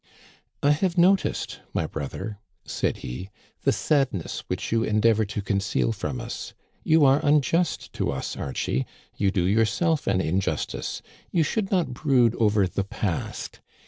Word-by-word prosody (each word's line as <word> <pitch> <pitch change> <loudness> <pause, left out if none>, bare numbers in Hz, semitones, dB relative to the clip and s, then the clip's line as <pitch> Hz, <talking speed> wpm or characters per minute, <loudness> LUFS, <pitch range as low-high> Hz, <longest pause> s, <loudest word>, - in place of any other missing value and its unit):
I 145 - +5
have 175 +4 +1
noticed, 185 +3 +2 0.2
my 80 - +1
brother," 95 +8 -5 0.3
said - - -1
he, 80 +11 -6 0.2
" - - -35
the - - +5
sadness 135 - 0
which - - -3
you 115 0 +2
endeavor 110 0 +3
to 105 0 -4
conceal 100 +3 0
from 125 +3 -3
us. 120 0 -6 0.3
You 155 -2 +5
are 135 +3 +4
un 150 0 +5
just 165 +6 0
to - - -1
us, 65 -1 -4
Archie, 65 -1 -2 0.3
you 100 - +2
do 95 -2 +1
yourself 115 - +2
an 95 -2 +2
injustice. 95 +2 -2 0.3
You 170 - +2
should 195 +6 -1
not 180 -9 +1
brood 125 -4 +3
over 105 -3 +4
the 95 +2 -2
past. 95 -2 -4
115 Hz, 155 wpm, -25 LUFS, 100-150 Hz, 0.3 s, I